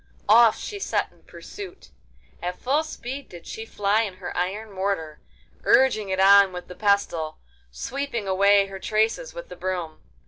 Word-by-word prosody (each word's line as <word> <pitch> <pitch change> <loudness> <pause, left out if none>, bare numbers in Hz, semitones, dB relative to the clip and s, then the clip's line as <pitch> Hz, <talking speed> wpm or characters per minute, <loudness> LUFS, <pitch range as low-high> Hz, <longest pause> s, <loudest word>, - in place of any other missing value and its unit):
Off 225 0 +7
she 410 - -6
set - - -1
in - - -26
pursuit. 390 -2 -11 0.5
At 180 +1 -4
full 280 +4 +1
speed 280 -3 -7
did 175 -2 -12
she 220 0 -7
fly 205 +1 +1
in 200 -5 -3
her 185 -1 -7
iron 205 +5 -2
mortar, 190 -6 -3 0.4
urging 220 -6 +4
it 190 0 -1
on 200 0 +7
with 180 0 -8
the - - -9
pestle, 180 -5 0 0.3
sweeping 235 - -4
away 200 +1 +4
her 195 -1 -8
traces 225 - 0
with - - -8
the - - -8
broom. 180 -4 -4
200 Hz, 165 wpm, -24 LUFS, 185-240 Hz, 0.5 s, Off